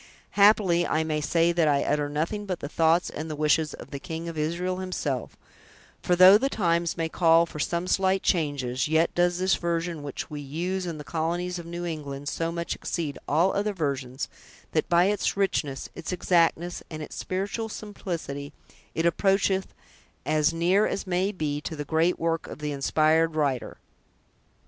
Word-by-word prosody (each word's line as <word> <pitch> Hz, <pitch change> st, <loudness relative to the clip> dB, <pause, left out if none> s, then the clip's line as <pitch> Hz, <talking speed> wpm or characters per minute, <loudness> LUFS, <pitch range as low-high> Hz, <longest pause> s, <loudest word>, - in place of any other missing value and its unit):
Happily, 200 Hz, -4 st, +4 dB
I 160 Hz, -, +1 dB
may 155 Hz, -1 st, -1 dB
say 165 Hz, +3 st, +2 dB
that 170 Hz, -2 st, +2 dB
I 140 Hz, -1 st, +3 dB
utter 145 Hz, 0 st, 0 dB
nothing 165 Hz, +8 st, -2 dB
but 185 Hz, -3 st, -3 dB
the -, -, -5 dB
thoughts 165 Hz, +3 st, +2 dB
and 155 Hz, +2 st, -5 dB
the 155 Hz, -, -4 dB
wishes 150 Hz, 0 st, +1 dB
of -, -, -12 dB
the 140 Hz, -, -5 dB
King 160 Hz, +3 st, -6 dB
of 165 Hz, -, -5 dB
Israel 170 Hz, +4 st, -1 dB
himself; 170 Hz, -9 st, -3 dB, 0.6 s
for 180 Hz, -, +2 dB
though 185 Hz, +3 st, +9 dB
the 270 Hz, +3 st, 0 dB
times 170 Hz, -7 st, 0 dB
may 165 Hz, -1 st, 0 dB
call 165 Hz, 0 st, +4 dB
for 155 Hz, -, -9 dB
some 170 Hz, +3 st, -1 dB
slight 190 Hz, +1 st, +1 dB
changes, 145 Hz, -5 st, 0 dB
yet 160 Hz, +2 st, +2 dB
does 175 Hz, 0 st, +2 dB
this 185 Hz, +1 st, +2 dB
version 170 Hz, -1 st, -2 dB
which 145 Hz, -2 st, -5 dB
we 150 Hz, -1 st, -6 dB
use 175 Hz, +6 st, -3 dB
in 165 Hz, -2 st, -4 dB
the 150 Hz, -, -7 dB
colonies 175 Hz, +3 st, -2 dB
of 170 Hz, -, -9 dB
New 175 Hz, +1 st, -5 dB
England 145 Hz, -4 st, -5 dB
so 165 Hz, 0 st, -2 dB
much 170 Hz, 0 st, -3 dB
exceed 155 Hz, -5 st, -4 dB
all 170 Hz, +6 st, +3 dB
other 205 Hz, +1 st, 0 dB
versions, 140 Hz, -6 st, -3 dB, 0.4 s
that, -, -, 0 dB
by 175 Hz, +1 st, +5 dB
its 205 Hz, 0 st, 0 dB
richness, 150 Hz, -9 st, -1 dB
its 170 Hz, -, -6 dB
exactness, 175 Hz, -1 st, +1 dB
and 155 Hz, -1 st, -6 dB
its -, -, -9 dB
spiritual 200 Hz, +4 st, -3 dB
simplicity, 165 Hz, -10 st, -6 dB, 0.4 s
it 165 Hz, -, 0 dB
approacheth, 195 Hz, +2 st, +2 dB, 0.6 s
as 155 Hz, +1 st, +2 dB
near 175 Hz, +5 st, +2 dB
as -, -, -3 dB
may 185 Hz, +2 st, 0 dB
be, 150 Hz, -6 st, -3 dB
to 160 Hz, -, -5 dB
the 145 Hz, -1 st, -5 dB
great 165 Hz, +4 st, +2 dB
work 165 Hz, 0 st, -1 dB
of -, -, -8 dB
the 150 Hz, -1 st, -3 dB
inspired 155 Hz, +3 st, +2 dB
writer. 140 Hz, -5 st, -1 dB
165 Hz, 180 wpm, -26 LUFS, 150-180 Hz, 0.6 s, though